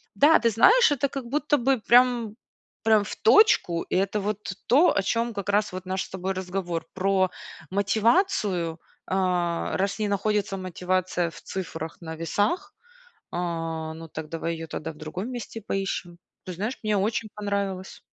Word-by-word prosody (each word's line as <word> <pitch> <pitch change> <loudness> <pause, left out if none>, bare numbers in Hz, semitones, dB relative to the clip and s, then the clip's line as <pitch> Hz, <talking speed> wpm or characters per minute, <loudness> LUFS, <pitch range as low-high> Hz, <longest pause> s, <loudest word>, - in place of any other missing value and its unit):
Да, 305 +3 +6
ты 230 - +3
знаешь, 400 - +6
это 280 0 +1
как 270 -3 -5
будто 295 +3 +1
бы 265 0 +2
прям 240 -2 +4 0.5
прям 220 -2 +4
в 205 - -6
точку. 425 - +4
Это 195 +2 +1
вот 210 -1 -3
то, 290 +9 +5
о - - +4
чем 230 +3 0
как 200 0 -4
раз 205 0 +2
вот 185 0 -6
наш 190 +1 -2
с - - -15
тобой 190 +1 -3
разговор- 180 -3 -3
про 190 0 +2 0.4
мотивацию. 200 - +1 0.3
А, 180 -3 0
раз 195 +2 -1
не 210 - 0
находится 200 0 0
мотивация 185 -1 -1
в - - -12
цифрах 165 -4 -6
на 160 -1 -6
весах, 205 - -1 0.6
а, 165 -2 -3
ну 165 0 -9
так 155 0 -7
давай 165 +1 -3
ее 165 0 -6
тогда 160 0 -5
в 150 - -19
другом 170 +8 -5
месте 235 -2 -6
поищем. 195 -3 -3 0.3
Ты 185 - -5
знаешь, 210 +9 -3
мне 215 -1 +1
очень 215 +3 0
понравилось. 200 -2 -3
195 Hz, 160 wpm, -26 LUFS, 175-225 Hz, 0.6 s, Да